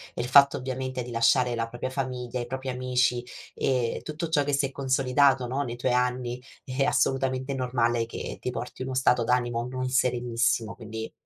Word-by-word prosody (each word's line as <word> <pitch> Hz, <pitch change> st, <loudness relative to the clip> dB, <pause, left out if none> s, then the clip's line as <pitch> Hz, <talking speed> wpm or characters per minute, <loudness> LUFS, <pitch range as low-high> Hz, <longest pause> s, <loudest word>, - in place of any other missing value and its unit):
Il 120 Hz, -, -2 dB
fatto, 140 Hz, +2 st, +6 dB
ovviamente, 130 Hz, -1 st, -4 dB
di 125 Hz, -, -8 dB
lasciare 120 Hz, +2 st, +3 dB
la 115 Hz, -1 st, -1 dB
propria 120 Hz, +2 st, -5 dB
famiglia, 125 Hz, -2 st, -3 dB
i 120 Hz, -, -4 dB
propri 130 Hz, +1 st, -4 dB
amici 125 Hz, -1 st, +1 dB, 0.3 s
e 125 Hz, -3 st, 0 dB
tutto 155 Hz, +2 st, -4 dB
ciò 145 Hz, -3 st, +3 dB
che 145 Hz, -, -2 dB
si 140 Hz, 0 st, +2 dB
è 135 Hz, -, -4 dB
consolidato, 135 Hz, -1 st, +2 dB
no, 130 Hz, +3 st, -2 dB
nei 120 Hz, -4 st, -3 dB
tuoi 125 Hz, +1 st, 0 dB
anni 125 Hz, 0 st, 0 dB, 0.2 s
è 130 Hz, +1 st, -1 dB
assolutamente 135 Hz, 0 st, +1 dB
normale 120 Hz, -3 st, 0 dB
che -, -, -6 dB
ti 125 Hz, -, -2 dB
porti 125 Hz, +1 st, -6 dB
uno 130 Hz, 0 st, -3 dB
stato 125 Hz, -2 st, +3 dB
d'animo 120 Hz, 0 st, 0 dB
non 130 Hz, 0 st, -3 dB
serenissimo, 120 Hz, -3 st, +1 dB
quindi, 110 Hz, -1 st, -7 dB
125 Hz, 180 wpm, -27 LUFS, 120-130 Hz, 0.3 s, fatto